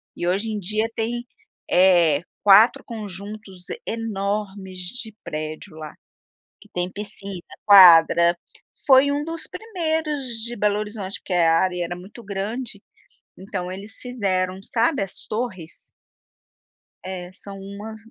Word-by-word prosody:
E 175 - -3
hoje 200 +5 0
em 210 -1 -2
dia 215 +4 0
tem, 240 +2 -2 0.4
eh, 175 -5 +5 0.2
4 205 +4 +7
conjuntos 205 -3 -8 0.2
enormes 200 -3 -3
de 220 +5 -6
prédio 155 +3 -6
lá, 155 -1 -8 0.7
que - - -18
tem 180 +1 -2
piscina, 200 -2 -6 0.2
quadra, 170 -3 +8 0.5
foi 275 +1 +6
um 290 +1 -1
dos 330 0 -4
primeiros 315 - -2
de 240 +1 -3
Belo 210 0 +1
Horizonte, 210 -2 -4
porque 185 - -4
a 165 -2 +4
área 180 -2 0
era 175 +1 -4
muito 205 +6 -12
grande, 205 +2 -4 0.5
então 185 -1 -5
eles 205 +3 -7
fizeram 190 -6 -1
sabe 235 +3 +1
as 195 - -7
torres. 210 -8 -3 1.3
É 185 -1 -6
sāo 200 +1 -9
uma 200 +3 -8
200 Hz, 125 wpm, -23 LUFS, 185-225 Hz, 1.3 s, quadra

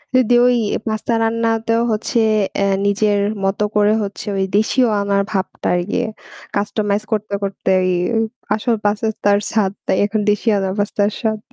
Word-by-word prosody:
যদি 250 -2 +4
ওই 245 -1 +3 0.3
পাস্তা 220 +2 -1
রান্নাতেও 230 0 +1
হচ্ছে 220 +2 0 0.4
এ - - +3 0.2
নিজের 205 0 +2 0.3
মতো 195 +2 0
করে 210 0 +4
হচ্ছে 200 +2 -6
ঐ - - -1 0.2
দেশিও 245 +4 +2
আনার 200 0 +1
ভাবটা 190 -2 -3
আর 175 - +1
কি। - - 0 0.6
customize 205 0 -1
করতে, 210 -1 -2
করতে 195 -1 -3
এই 185 - +1 0.6
আসল 230 +2 0
পাস্তার 205 -1 +1
স্বাদ 210 -4 +1
তাই - - +1
এখন 210 +1 -1
দেশিয়আনার 205 -3 0
পাস্তার 205 0 +1
স্বাদ। 220 -2 -1
210 Hz, 145 wpm, -18 LUFS, 200-225 Hz, 0.6 s, যদি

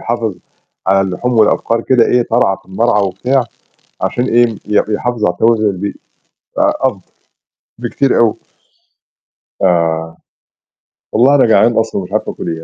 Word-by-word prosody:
يحافظ 115 -4 -2 0.5
على 95 +1 +3
اللحوم 95 +6 -2
والأبقار 115 +1 +2
كده 120 -1 +3
إيه 125 - +2
ترعى 115 -5 +1
في - - -27
المرعى 105 +1 +1
وبتاع، 125 +7 0 0.6
عشان 120 - -1
إيه، 120 -1 +3
ي 105 -1 -1
يحافظ 110 +1 -2
على 90 - 0
توازن 115 -1 +2
البيئي. 100 0 -2 0.7
آآ، - - +3
أفضل 125 -8 0 0.8
بكتير 125 +3 0
أوي. 115 -2 +3 1.3
آه. 80 -2 0 1.0
والله 130 +6 +4
أنا 140 - +4
جعان 110 +1 +4
أصلًا 110 -3 -1
ومش 90 - -10
عارف - - -2
آكل - - -5
إيه. 80 - -10
110 Hz, 145 wpm, -14 LUFS, 95-120 Hz, 1.3 s, والله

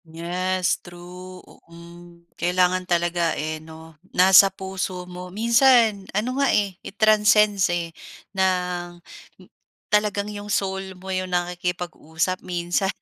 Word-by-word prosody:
Yes, 180 +3 -2
true. 180 +1 -12
U - - -19
hmm, 170 0 -15
kailangan 180 +1 0
talaga, 175 -1 0
eh, 155 0 -4
'no, 160 0 -13 0.2
nasa 190 +2 +7
puso 190 -1 -5
mo. 180 0 -9
Minsan 230 -1 +3
ano 255 +6 -1
nga, 275 - +3
eh, 200 -2 +1
it 200 - -11
transcends, 210 -2 +4
eh, 170 -1 -2 0.4
ng 180 -2 -1
m 175 - -17 0.5
talagang 210 0 +1
'yong 205 0 -8
soul 190 -1 -2
mo 190 +1 -8
'yong 185 0 -2
nakikipag-usap 180 -1 -2
minsan, 175 +2 -1
180 Hz, 125 wpm, -23 LUFS, 175-195 Hz, 0.5 s, nasa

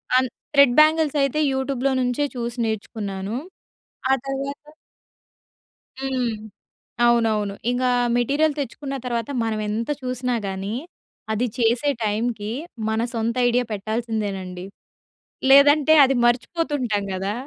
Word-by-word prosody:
అన్ 260 0 +4 0.3
thread 280 -3 +6
bangles 310 -1 +4
అయితే 275 +2 +1
యూట్యూబ్‌లో 265 0 -1
నుంచే 250 +4 0
చూసి 240 0 -4
నేర్చుకున్నాను. 205 -1 -4 0.8
ఆ - - +6
తర్వాత 280 +2 -5 1.3
హ్మ్. 265 -2 -1 0.8
అవునవును. 220 -4 +2 0.2
ఇంక 250 +1 -1 0.3
మెటీరియల్ 290 +5 +2
తెచ్చుకున్న 275 +1 -4
తర్వాత 235 -1 -2
మనం 220 -1 -1
ఎంత 225 +4 -2
చూసినా 250 -1 -2
గానీ, 195 +2 -4 0.6
అది 220 +3 0
చేసే 240 +4 +2
టైమ్‌కి, 215 0 -1 0.4
మన 220 0 0
సొంత 230 +1 -1
ఐడియా 245 +1 +2
పెట్టాల్సిందేనండి. 205 -4 -3 0.9
లేదంటే 290 +2 +7
అది 265 0 +1
మర్చిపోతుంటాం 250 - 0
కదా! 195 +2 -2
240 Hz, 105 wpm, -23 LUFS, 220-275 Hz, 1.3 s, లేదంటే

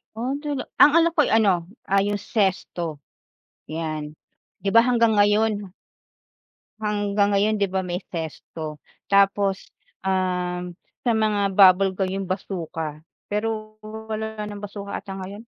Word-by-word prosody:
Oh 255 +5 -2
talaga. 285 -2 -3
Ang 295 - +8
alam 335 0 +5
ko'y 300 - +4
ano 195 -6 +3 0.2
ay 200 +1 +2
yung 205 - -3
zest-o 175 - -1 0.6
yan 155 -1 -4 0.5
'di 200 - -2
'ba 230 +3 +6
hanggang 230 -3 +3
ngayon? 205 -1 +2 1.1
Hanggang 205 -1 +1
ngayon 205 +2 +3
'di 200 - +2
'ba 190 0 0
may 180 +1 -3
zest-o 160 -2 -6 0.3
tapos, 200 0 +3 0.3
um, 180 -2 -1 0.3
sa 240 - +4
mga 210 -3 +1
bubble 190 0 +6
gum, 185 0 -1
yung 195 0 -3
bazooka, 165 -5 -4 0.3
pero 215 0 -2
wala 220 0 -5
ng 205 0 -8
bazooka 200 0 -6
ata 195 - -8
ngayon. 200 +4 -8
200 Hz, 130 wpm, -24 LUFS, 185-215 Hz, 1.1 s, Ang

